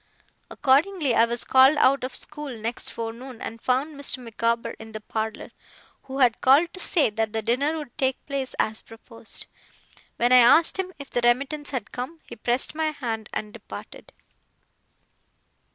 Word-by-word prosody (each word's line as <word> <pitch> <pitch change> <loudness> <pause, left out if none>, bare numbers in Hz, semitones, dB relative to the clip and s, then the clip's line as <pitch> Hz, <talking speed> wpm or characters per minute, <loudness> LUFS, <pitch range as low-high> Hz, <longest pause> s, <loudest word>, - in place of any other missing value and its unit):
Accordingly 290 +1 +2
I 230 - +5
was 235 0 -1
called 265 +3 +6
out 275 -1 +4
of 255 -1 -4
school 300 -1 -5
next 225 +2 -4
forenoon, 230 +2 -7
and 225 0 -7
found 265 +5 0
Mr. 280 -1 -1
Micawber 230 -1 -1
in 220 0 -11
the 215 - -5
parlour; 220 +1 -4 0.5
who 265 0 -6
had 250 -4 +3
called 290 +6 +5
to 370 - -9
say 310 -9 +3
that 220 0 -2
the 220 0 -2
dinner 280 +8 +1
would 295 -6 -8
take 265 -1 -1
place 275 -2 -4
as 220 0 -1
proposed. 225 0 -6 0.7
When 240 +1 +1
I 255 - +9
asked 315 +10 +6
him 370 -1 -2
if 280 -1 -10
the 245 - 0
remittance 275 +5 +1
had 250 -7 -4
come, 260 +7 -6
he - - -9
pressed 240 +4 0
my 315 0 -1
hand 230 -7 -4
and 210 0 -5
departed. - - -11
255 Hz, 170 wpm, -25 LUFS, 230-285 Hz, 0.7 s, I